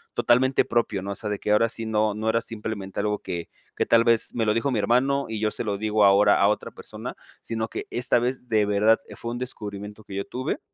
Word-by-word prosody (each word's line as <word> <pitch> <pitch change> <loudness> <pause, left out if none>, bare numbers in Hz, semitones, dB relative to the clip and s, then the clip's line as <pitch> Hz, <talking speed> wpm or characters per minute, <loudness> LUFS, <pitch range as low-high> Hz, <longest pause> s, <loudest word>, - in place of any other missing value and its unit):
totalmente 130 +2 +3
propio, 115 -6 0
¿no?, 100 - -4
o - - -4
sea 105 - -3
de 105 - -2
que 105 - -2
ahora 115 +2 +3
sí 115 0 -4
no 110 -1 +1
no 110 +1 -1
era 115 +1 +2
simplemente 105 -4 -6
algo 105 0 0
que 85 -1 -5 0.3
que - - 0
tal 115 0 +5
vez 115 0 +2
me 115 -2 +1
lo 105 - +3
dijo 115 +5 0
mi 110 - 0
hermano 135 +6 +2
y 110 - -3
yo 110 0 +1
se - - -3
lo 105 -3 -2
digo 110 0 +1
ahora 100 +1 +5
a 100 - +5
otra 105 - -2
persona - - -8 0.3
sino 110 -1 -3
que - - -6
esta 125 0 +2
vez 125 +1 -3
de 110 -2 +3
verdad, 105 +2 +3
eh, - - -11
fue 115 - -5
un 120 - -4
descubrimiento 105 -4 -6
que 100 - -9
yo 100 - -2
tuve 130 +1 -3
110 Hz, 250 wpm, -25 LUFS, 105-115 Hz, 0.3 s, tal